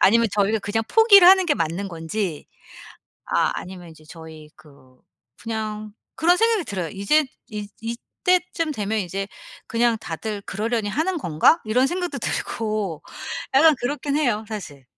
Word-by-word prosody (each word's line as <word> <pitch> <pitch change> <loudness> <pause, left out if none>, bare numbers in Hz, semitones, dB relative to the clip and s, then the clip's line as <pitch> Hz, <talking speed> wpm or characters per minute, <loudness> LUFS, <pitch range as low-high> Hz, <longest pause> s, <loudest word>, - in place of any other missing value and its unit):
아니면 230 +4 +5
저희가 210 +2 +2
그냥 215 +2 -2
포기를 415 - +7
하는 380 -1 +6
게 295 - +3
맞는 170 - -2
건지. 170 0 -4 0.8
아 - - +1
아니면 180 -1 -8
이제 155 -1 -17
저희 160 -2 -11
그 140 -5 -20 0.4
그냥 215 -2 -5 0.2
그런 350 +2 +3
생각이 450 -3 +2
들어요. 185 - -4
이제 270 +11 +2 0.2
'이 210 -2 -6
이때쯤 330 - -1
되면 215 -2 -2
이제 195 +1 -3 0.4
그냥 235 0 +1
다들 205 +5 -5
그러려니 220 +2 -2
하는 325 - -1
건가?' 175 - +3
이런 245 +5 +2
생각도 350 -3 -3
들고 215 -8 -3 0.5
약간 310 +2 +7
그렇긴 285 +3 -2
해요 240 -8 0
사실. 155 -11 -8
215 Hz, 300 characters per minute, -23 LUFS, 190-290 Hz, 0.8 s, 포기를